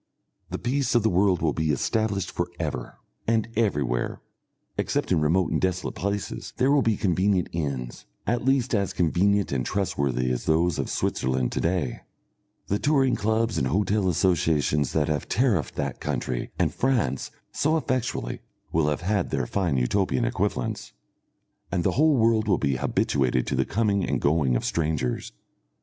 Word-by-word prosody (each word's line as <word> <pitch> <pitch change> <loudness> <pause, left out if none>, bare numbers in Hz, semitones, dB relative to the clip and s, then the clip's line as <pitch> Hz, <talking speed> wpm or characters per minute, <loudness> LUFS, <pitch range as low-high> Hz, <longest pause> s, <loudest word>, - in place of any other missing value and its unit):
The - - -3
peace 130 +2 0
of 120 - +4
the 110 - +2
world 90 -1 +2
will 80 -3 +2
be 80 -1 -1
established 100 - 0
for - - -2
ever, 60 -1 -4 0.3
and 115 -1 +2
everywhere, 70 - 0 0.6
except - - -1
in 80 - +3
remote 85 +4 +2
and - - 0
desolate 95 0 -1
places, 100 +1 -4
there 130 +3 +3
will 145 -1 +4
be 110 -4 +1
convenient 95 0 +1
inns, 65 -7 -4 0.2
at 120 +1 0
least 135 -1 +2
as 100 -3 +1
convenient 100 +4 +2
and 65 -2 0
trustworthy 70 -10 -1
as 60 - -2
those 80 +2 +2
of - - -2
Switzerland 65 -1 0
to - - -2
day; 85 -7 -1 0.7
the 100 - -1
touring 135 -4 +3
clubs 110 +2 0
and 65 - +1
hotel 100 +5 +1
associations 80 -5 +1
that 75 -2 +2
have 75 -3 -2
tariffed 110 - +1
that - - -3
country - - -3
and - - +1
France 120 - 0 0.2
so 155 +2 +1
effectually 130 - -2 0.3
will 80 -2 +2
have 75 - -2
had 95 +1 0
their - - -1
fine 85 -1 0
Utopian 65 +4 +1
equivalents, 60 - -2 0.8
and 90 - 0
the - - +2
whole 155 0 +4
world 110 -1 +3
will 100 - +3
be 70 -2 0
habituated 65 -1 +1
to - - -1
the 65 0 +1
coming 100 -3 +1
and - - 0
going 70 -4 +2
of - - -1
strangers. 75 -6 -1
90 Hz, 165 wpm, -25 LUFS, 70-110 Hz, 0.8 s, of